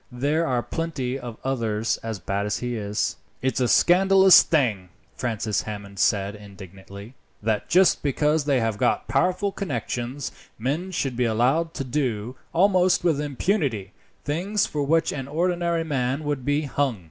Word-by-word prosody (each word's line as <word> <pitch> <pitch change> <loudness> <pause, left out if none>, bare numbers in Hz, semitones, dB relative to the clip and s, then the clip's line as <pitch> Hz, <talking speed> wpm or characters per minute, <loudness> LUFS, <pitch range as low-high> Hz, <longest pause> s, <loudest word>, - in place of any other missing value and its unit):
There 145 +7 0
are 125 -2 0
plenty 135 -6 -3
of 120 -3 -8
others 115 -4 -1
as 110 -2 -5
bad 100 +3 -2
as 105 - -1
he 120 -1 -3
is." 105 -1 -2 0.3
"It's 130 +1 0
a 125 - +2
scandalous 190 +4 +6
thing," 110 - 0 0.3
Francis 110 -3 -1
Hammond 100 -2 -8
said 100 0 +2
indignantly, 100 +1 -12 0.3
"that, 110 -1 -1
just 185 +2 +4
because 150 +2 +1
they 140 -3 +2
have 110 -3 -1
got - - +1
powerful 185 +2 +1
connections, 125 - -4 0.3
men 145 +11 -2
should 135 -8 -2
be 125 +1 +1
allowed 130 +9 +1
to 135 - -3
do, 125 -3 -2 0.2
almost 185 0 +3
with 160 -5 +2
impunity, 140 - -1 0.3
things 185 +8 0
for 150 - -3
which 160 +3 +2
an 135 -2 -5
ordinary 170 +2 0
man 135 -1 -1
would 145 -3 -2
be 145 +3 +1
hung. 140 -5 -1
130 Hz, 155 wpm, -24 LUFS, 110-160 Hz, 0.3 s, scandalous